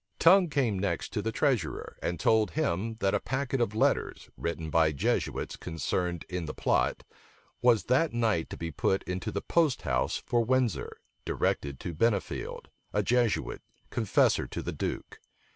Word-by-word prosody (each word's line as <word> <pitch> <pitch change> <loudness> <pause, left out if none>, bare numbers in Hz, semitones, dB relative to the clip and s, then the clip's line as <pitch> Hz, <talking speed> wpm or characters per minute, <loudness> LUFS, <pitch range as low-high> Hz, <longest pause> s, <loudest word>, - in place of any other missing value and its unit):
Tongue 180 +1 +6
came 125 -9 +1
next 95 -4 -2
to - - 0
the - - -2
treasurer, - - -1
and 85 -1 -2
told 110 -2 +3
him, 95 +7 -1
that 95 0 +2
a - - +2
packet 130 -1 -2
of 110 -3 0
letters, 110 - 0
written 80 -1 -4
by 80 -1 +4
Jesuits 70 - -1
concerned 85 +1 -2
in 90 -2 -3
the 75 - -6
plot, - - +1 0.6
was 120 -3 +4
that 140 +6 +2
night 110 -8 0
to - - -7
be 85 0 -4
put 95 +6 0
into 90 0 -3
the 100 - -3
post 160 -7 +2
house 65 -2 0
for 120 -1 0
Windsor, 125 -1 0 0.3
directed 70 -2 -1
to 85 - -4
Bennifield, 100 +4 -1 0.2
a 105 - +1
Jesuit, 120 0 +1 0.3
confessor 110 -4 +2
to - - -5
the - - -3
duke. - - -4
105 Hz, 160 wpm, -29 LUFS, 85-120 Hz, 0.6 s, Tongue